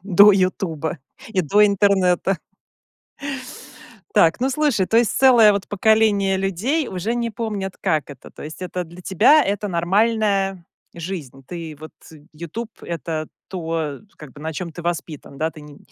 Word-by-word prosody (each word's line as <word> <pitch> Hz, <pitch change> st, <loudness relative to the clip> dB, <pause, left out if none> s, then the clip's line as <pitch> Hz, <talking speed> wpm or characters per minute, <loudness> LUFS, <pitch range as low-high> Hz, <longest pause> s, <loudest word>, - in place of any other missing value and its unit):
до 200 Hz, +1 st, +7 dB
"Ютуба" 185 Hz, -5 st, -1 dB, 0.3 s
и 195 Hz, -4 st, 0 dB
до 205 Hz, +7 st, +4 dB
интернета. 195 Hz, -2 st, +2 dB, 1.8 s
Так, 165 Hz, +5 st, +4 dB
ну 260 Hz, +2 st, +1 dB
слушай, 270 Hz, -8 st, +1 dB
то 225 Hz, -, +1 dB
есть 235 Hz, -2 st, +4 dB
целое 245 Hz, -5 st, +7 dB
вот 200 Hz, -1 st, -2 dB
поколение 205 Hz, -2 st, +3 dB
людей 200 Hz, -, -1 dB
уже 210 Hz, +5 st, -3 dB
не 235 Hz, -1 st, -1 dB
помнят, 200 Hz, -3 st, -4 dB
как 155 Hz, -3 st, 0 dB
это. 135 Hz, -, -12 dB
То -, -, -11 dB
есть 155 Hz, +4 st, -8 dB
это 180 Hz, 0 st, -3 dB
для 175 Hz, +2 st, -13 dB
тебя- 230 Hz, -, +5 dB
это 205 Hz, +1 st, -1 dB
нормальная 195 Hz, +1 st, +1 dB, 0.3 s
жизнь. 160 Hz, -7 st, -7 dB
Ты 165 Hz, -4 st, -7 dB
вот 155 Hz, -, -9 dB, 0.4 s
"Ютуб"- 170 Hz, +9 st, -6 dB
это 160 Hz, -1 st, -4 dB, 0.2 s
то, 165 Hz, -5 st, -3 dB, 0.2 s
как 150 Hz, -3 st, -11 dB
бы 145 Hz, -, -13 dB
на 160 Hz, +1 st, -4 dB
чём 170 Hz, +2 st, -5 dB
ты 170 Hz, +1 st, -9 dB
воспитан, 165 Hz, -4 st, -5 dB
да. 160 Hz, +3 st, -1 dB
Ты 155 Hz, -, -13 dB
не 150 Hz, -1 st, -13 dB
185 Hz, 155 wpm, -21 LUFS, 165-210 Hz, 1.8 s, до